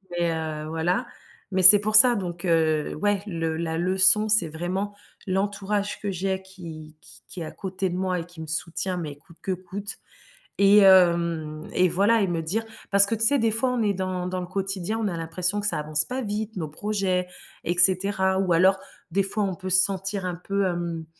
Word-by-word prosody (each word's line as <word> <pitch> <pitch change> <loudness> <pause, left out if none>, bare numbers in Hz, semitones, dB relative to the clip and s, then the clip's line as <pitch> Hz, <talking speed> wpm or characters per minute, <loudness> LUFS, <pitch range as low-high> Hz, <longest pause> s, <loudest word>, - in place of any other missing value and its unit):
simple 190 -3 -14
mais, 170 -1 +1
heu, 155 -1 -5
voilà, 165 +3 -1 0.4
mais 190 -1 0
c'est 200 +3 +9
pour 215 +1 +3
ça 240 +2 +9
donc, 175 -3 -5
heu, 160 -3 +1
ouais, 205 +3 -1
le 165 -4 -3
la 165 -1 -3
leçon, 190 +4 +4
c'est 205 -6 +3
vraiment 185 +6 -4 0.3
l'entourage 200 +1 -2
que 200 -2 -3
j'ai 190 +1 -2
qui 160 -5 -11
qui - - -15
qui 180 - -8
est - - -4
à - - -7
côté 190 -1 -4
de 180 - -4
moi 185 -1 -2
et - - -7
qui 175 -2 -14
me 160 - -7
soutient 170 +3 -3
mais 150 -4 -6
coûte 165 +2 -21
que 190 - -2
coûte 195 +3 -6 0.6
et, 200 +1 +5
hem, 170 -5 +3
et 185 0 +2
voilà, 205 +6 +2
et 195 - +1
me 170 -2 -2
dire 215 +8 -2 0.3
parce 200 0 +8
que 225 - -1
tu 225 - +1
sais, 285 +4 +3
des 225 -1 +2
fois, 250 +4 +2
on 240 - -1
est 205 -2 +1
dans 185 -1 -3
dans 185 0 -4
le - - -5
quotidien, 195 +3 -3
on 215 - -1
a 170 -3 -4
l'impression 180 +4 -2
que 205 - -4
ça 150 - -1
avance 150 0 +1
pas 255 +1 -4
vite, 215 0 -4
nos 165 -4 -4
projets, 185 +1 -2 0.4
et 175 - -1
cetera. 190 +1 +2
Ou 190 -2 +1
alors, 185 +3 +4 0.3
des 195 +3 0
fois, 205 +2 -2
on 190 -2 -2
peut 185 0 -7
se 185 +1 +5
sentir 195 0 -3
un 180 -1 -3
peu, 195 +3 -2
hem, 170 -2 -3
185 Hz, 220 wpm, -24 LUFS, 170-200 Hz, 0.6 s, c'est